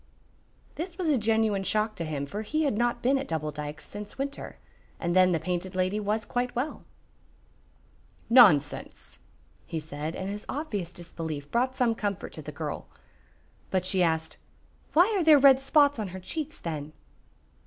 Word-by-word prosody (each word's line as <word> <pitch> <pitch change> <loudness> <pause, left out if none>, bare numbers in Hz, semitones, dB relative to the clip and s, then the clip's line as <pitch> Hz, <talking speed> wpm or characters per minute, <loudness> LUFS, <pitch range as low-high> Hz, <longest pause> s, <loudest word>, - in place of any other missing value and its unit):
This 340 +2 -5
was 360 -4 0
a 290 - +4
genuine 220 -2 +2
shock 215 +2 +1
to 170 - -3
him, 145 -3 -3
for 205 +9 -5
he 310 +9 -1
had 280 -8 +1
not 240 +2 0
been 270 +2 +3
at 270 - -5
Double 155 -2 -2
Dykes 150 0 -7
since 205 0 -8
winter, 280 +1 -5 0.4
and 170 +1 -1
then 185 0 +6
the 165 - +1
Painted 180 +2 -3
Lady 185 +3 +1
was 210 +1 -1
quite 245 0 -2
well. 260 +6 -3 1.4
"Nonsense!" 190 - +4 0.5
he 165 - -3
said, 155 +1 -5
and 190 - -4
his 205 +1 -4
obvious 225 - -3
disbelief 160 -4 -7
brought 255 +2 +1
some 240 -2 +3
comfort 205 -4 -3
to 155 - -7
the 150 +1 -7
girl. 150 0 -5 0.8
But 185 -1 0
she 185 0 +1
asked, 160 -2 0 0.6
"Why 335 - +7
are 375 - +2
there 310 -2 +8
red 270 -1 +7
spots 285 -1 +3
on 210 - -2
her 190 +1 -7
cheeks, 305 - -5
then?" 155 -2 -5
205 Hz, 170 wpm, -28 LUFS, 165-255 Hz, 1.4 s, there